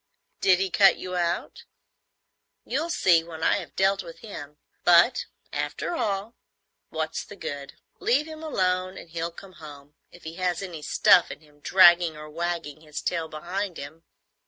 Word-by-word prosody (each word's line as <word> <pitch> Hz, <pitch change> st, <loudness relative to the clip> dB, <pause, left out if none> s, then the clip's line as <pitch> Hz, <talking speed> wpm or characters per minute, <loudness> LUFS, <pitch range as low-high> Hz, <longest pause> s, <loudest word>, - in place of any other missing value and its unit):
"Did 185 Hz, -2 st, +4 dB
he 190 Hz, 0 st, -1 dB
cut 195 Hz, +1 st, +5 dB
you 185 Hz, 0 st, -6 dB
out?" 175 Hz, -, -2 dB, 1.0 s
"You'll 310 Hz, +7 st, -2 dB
see 175 Hz, -, +4 dB
when 165 Hz, -1 st, -8 dB
I -, -, +3 dB
have -, -, -8 dB
dealt 195 Hz, +1 st, +2 dB
with 170 Hz, -1 st, -12 dB
him. 150 Hz, -9 st, -9 dB, 0.3 s
But, 175 Hz, +7 st, +5 dB, 0.3 s
after -, -, -3 dB
all, 205 Hz, -4 st, -2 dB, 0.6 s
what's 160 Hz, 0 st, -3 dB
the 205 Hz, -, -12 dB
good? 145 Hz, -5 st, -7 dB, 0.2 s
Leave 270 Hz, +6 st, +2 dB
him 315 Hz, 0 st, -9 dB
alone 185 Hz, -10 st, -1 dB
and 165 Hz, -, -11 dB
he'll 165 Hz, 0 st, -3 dB
come 185 Hz, +3 st, -13 dB
home, 145 Hz, -1 st, -12 dB, 0.2 s
if 175 Hz, -, -17 dB
he 160 Hz, +2 st, -8 dB
has 180 Hz, 0 st, -1 dB
any 170 Hz, -5 st, -7 dB
stuff 170 Hz, +3 st, +5 dB
in -, -, -9 dB
him, 150 Hz, -1 st, -23 dB
dragging 175 Hz, -1 st, +5 dB
or 150 Hz, 0 st, -10 dB
wagging 165 Hz, -2 st, -4 dB
his 150 Hz, -1 st, -7 dB
tail 165 Hz, -2 st, -2 dB
behind 175 Hz, +4 st, -4 dB
him. 155 Hz, +4 st, -9 dB
175 Hz, 165 wpm, -26 LUFS, 160-195 Hz, 1.0 s, cut